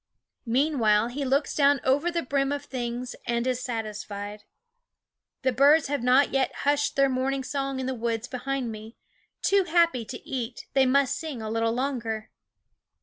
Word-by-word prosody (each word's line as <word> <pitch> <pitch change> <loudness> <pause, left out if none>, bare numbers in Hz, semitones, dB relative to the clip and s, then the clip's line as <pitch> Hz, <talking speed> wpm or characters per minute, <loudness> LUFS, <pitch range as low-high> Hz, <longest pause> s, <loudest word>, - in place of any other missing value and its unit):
Meanwhile 230 -4 +2
he 280 +4 -4
looks 275 +2 +1
down 285 -1 +4
over 285 +6 +2
the 340 -1 -1
brim 275 +1 0
of 285 0 -3
things 245 -1 -4
and 235 0 0
is 255 -1 0
satisfied. 210 -3 -5 1.0
The 260 - +3
birds 285 +4 +5
have 285 -3 -1
not 255 +3 +4
yet 270 - +1
hushed 290 0 +2
their 275 0 +4
morning 265 +1 -1
song 275 0 -3
in 260 - -2
the 260 - -1
woods 230 0 -2
behind 255 -1 -3
me; 220 +1 -10 0.5
too 395 -1 +3
happy 335 -7 +3
to 245 +2 -7
eat, 245 -2 -4
they 270 -1 +4
must 275 0 +2
sing 310 -6 -5
a 215 -1 -5
little 225 0 +1
longer. 230 -4 -3
260 Hz, 165 wpm, -26 LUFS, 235-280 Hz, 1.0 s, birds